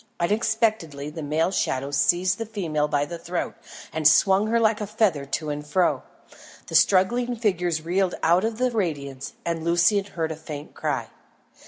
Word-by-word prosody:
Unexpectedly 210 -7 0
the 160 +1 -7
male 155 +4 0
shadow 135 -6 -1
seized 180 +7 +2
the 225 - -2
female 165 -9 -1
by 145 -1 0
the 170 +3 -7
throat 175 +1 -3 0.4
and 155 -2 +3
swung 195 +5 +4
her 230 +1 +2
like 220 -1 +2
a 210 - -3
feather 200 -9 +1
to 150 +2 -3
and 145 0 -4
fro. 175 +4 +1 0.6
The - - -10
struggling 240 +6 +3
figures 180 -7 0
reeled 180 +2 0
out 170 +4 +4
of 225 0 -1
the 250 +1 +1
radiance 140 - -3
and 170 -1 -2
Lucian 175 +4 +3
heard 165 -5 -3
a - - -4
faint 150 -2 -9
cry. - - -3
175 Hz, 170 wpm, -24 LUFS, 155-210 Hz, 0.6 s, swung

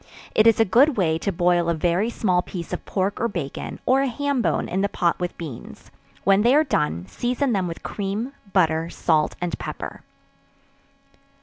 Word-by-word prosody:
It 215 - +5
is 225 - +5
a 225 - +5
good 255 +8 +4
way 160 -4 +1
to 200 - -1
boil 175 -1 +2
a 170 - +1
very 175 +7 +1
small 185 -6 +1
piece 175 -2 -7
of - - -4
pork 195 +1 -1
or 235 - +2
bacon, 170 -10 -5
or 265 +1 +4
a 275 - +1
ham 280 +1 -1
bone - - 0
in 190 - -1
the 200 - +1
pot 170 -3 0
with 180 -1 -3
beans; 150 -9 -9 0.3
when 195 +1 +4
they 240 +5 +4
are 305 - +5
done, 150 - -1
season 245 - -1
them 190 -3 0
with 165 - -7
cream, 210 +6 -3 0.2
butter, 165 -3 +2
salt 155 -3 +1
and 175 -1 -3
pepper. - - -6
190 Hz, 190 wpm, -23 LUFS, 170-230 Hz, 0.3 s, It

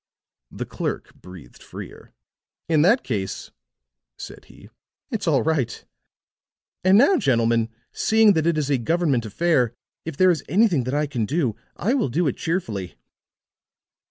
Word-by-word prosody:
The - - -6
clerk - - -5
breathed 90 -4 -14
freer. - - -11 0.6
"In 160 -2 +3
that 210 - +4
case," 100 -6 -4 0.7
said - - -10
he, - - -17 0.4
"it's - - -3
all - - +3
right. 145 -7 -1 1.0
And 190 +2 +5
now, 285 - +5
gentlemen, 115 - +1 0.2
seeing 220 -1 +4
that 160 -2 0
it 170 -2 +1
is 145 -2 -1
a 135 - +2
government 140 -3 0
affair, 125 - +1 0.3
if 160 -3 -7
there 185 +1 +5
is 160 -5 -2
anything 185 - +3
that 130 +3 -2
I 150 +1 +1
can 125 -7 -3
do, 140 -7 0 0.2
I 220 +8 0
will 260 - 0
do 170 +9 0
it 135 - 0
cheerfully." 115 - -3
150 Hz, 150 wpm, -23 LUFS, 120-175 Hz, 1.0 s, And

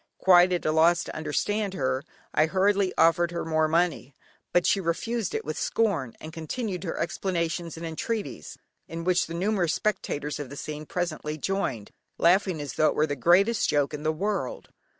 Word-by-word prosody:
Quite 180 -1 +6
at 180 - -1
a 155 - +2
loss 165 +2 +4
to - - -8
understand 195 +6 -1
her, 130 -2 -1 0.3
I 155 - +3
hurriedly 195 +1 +2
offered 170 +1 +4
her 170 0 -4
more 160 -1 +2
money, 165 -4 0 0.4
but 175 -1 +3
she 200 - +3
refused 220 - -2
it 445 - -3
with - - -4
scorn, 170 - 0
and 155 +1 -9
continued 185 +4 -4
her 165 - -3
explanations 170 -1 -2
and 165 - -6
entreaties, 160 - -4 0.3
in 165 +1 -6
which 180 0 +2
the 165 - -6
numerous 180 -2 +1
spectators 150 -9 -2
of 145 -3 -5
the 140 - -9
scene 150 +1 -6
presently 155 -3 -3
joined, 140 - -2 0.3
laughing 180 0 +3
as 145 -3 -5
though 155 - +3
it - - 0
were 155 - +3
the 145 -2 -3
greatest 195 - +3
joke 145 -1 +1
in 150 - -5
the 155 +1 +1
world. 190 -4 -3
170 Hz, 185 wpm, -26 LUFS, 155-190 Hz, 0.4 s, Quite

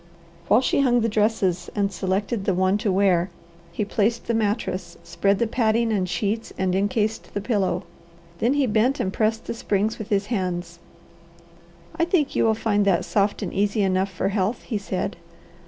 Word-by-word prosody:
While 225 - +5
she 270 - +2
hung 245 -3 +3
the 225 - +2
dresses 205 -5 0
and 200 -1 +1
selected 195 +3 -2
the 190 - +1
one 190 +2 +2
to 210 -2 0
wear, 185 -2 +2 0.4
he 200 +5 -2
placed 220 +3 0
the 235 - -1
mattress, 200 -5 -1
spread 195 +4 +1
the 235 - +1
padding 225 0 +1
and 185 -3 0
sheets, 215 +4 -2
and 185 -1 0
encased 210 +3 -1
the - - +1
pillow. 195 -4 0 0.6
Then 250 +5 +2
he 285 -2 +3
bent 235 +5 +2
and 190 - -1
pressed 220 0 0
the - - -3
springs 215 0 -1
with 215 - -6
his 200 -1 +1
hands. 175 -4 -3 1.2
"I 335 - +2
think 335 -5 +1
you - - +3
will 220 -1 +3
find 210 -2 +1
that 190 -4 +2
soft 205 +1 0
and 185 - -4
easy 205 +1 +1
enough 190 0 +1
for 190 +1 -1
health," 205 +3 -1
he 220 -5 -3
said. 195 0 -3
205 Hz, 185 wpm, -24 LUFS, 190-225 Hz, 1.2 s, While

